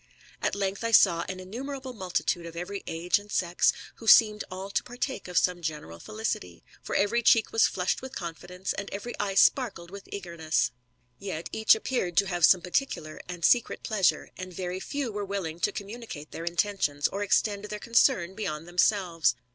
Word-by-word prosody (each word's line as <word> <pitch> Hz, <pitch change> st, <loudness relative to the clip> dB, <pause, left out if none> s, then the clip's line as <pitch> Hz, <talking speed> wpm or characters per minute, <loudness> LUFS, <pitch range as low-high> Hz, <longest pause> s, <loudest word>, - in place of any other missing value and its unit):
At -, -, 0 dB
length 195 Hz, +1 st, -2 dB
I 230 Hz, -, 0 dB
saw 180 Hz, -6 st, +5 dB
an 185 Hz, 0 st, -5 dB
innumerable 260 Hz, +7 st, -6 dB
multitude 180 Hz, -4 st, -2 dB
of 165 Hz, -, -10 dB
every 180 Hz, +4 st, -5 dB
age 170 Hz, +4 st, +1 dB
and 205 Hz, 0 st, -14 dB
sex, 175 Hz, -1 st, +2 dB, 0.3 s
who 225 Hz, -, -11 dB
seemed 215 Hz, -1 st, +7 dB
all 190 Hz, +1 st, -6 dB
to -, -, +1 dB
partake 245 Hz, -3 st, -5 dB
of 180 Hz, -1 st, -3 dB
some 180 Hz, 0 st, +2 dB
general 150 Hz, -, -5 dB
felicity; 90 Hz, -, -4 dB, 0.2 s
for -, -, -5 dB
every 215 Hz, +4 st, +2 dB
cheek 225 Hz, -1 st, +4 dB
was 225 Hz, -, +4 dB
flushed 180 Hz, 0 st, -1 dB
with 260 Hz, 0 st, -8 dB
confidence, 180 Hz, +2 st, -5 dB
and 200 Hz, -, -5 dB
every 205 Hz, +5 st, -6 dB
eye 200 Hz, -2 st, -1 dB
sparkled 195 Hz, -6 st, +3 dB
with 200 Hz, 0 st, -10 dB
eagerness; 170 Hz, -5 st, -1 dB, 0.5 s
yet 180 Hz, -5 st, -5 dB
each 220 Hz, 0 st, +5 dB
appeared 220 Hz, -7 st, -2 dB
to 200 Hz, -, +5 dB
have 175 Hz, -3 st, +3 dB
some 185 Hz, -, +5 dB
particular 180 Hz, -, -2 dB
and 175 Hz, -1 st, -2 dB
secret 240 Hz, -2 st, +3 dB
pleasure, 200 Hz, -5 st, +1 dB
and 185 Hz, -1 st, -7 dB
very 180 Hz, 0 st, -3 dB
few 275 Hz, +3 st, -3 dB
were 205 Hz, 0 st, -3 dB
willing 190 Hz, -5 st, -4 dB
to -, -, +1 dB
comrauni 225 Hz, +3 st, -8 dB
cate 150 Hz, 0 st, -8 dB
their 165 Hz, -, -6 dB
intentions, 170 Hz, -5 st, 0 dB
or 200 Hz, -, -4 dB
extend 205 Hz, 0 st, +1 dB
their 210 Hz, 0 st, -5 dB
concern 230 Hz, -5 st, +2 dB
beyond 165 Hz, -6 st, -4 dB
themselves. 175 Hz, -, +2 dB
190 Hz, 185 wpm, -28 LUFS, 170-215 Hz, 0.5 s, seemed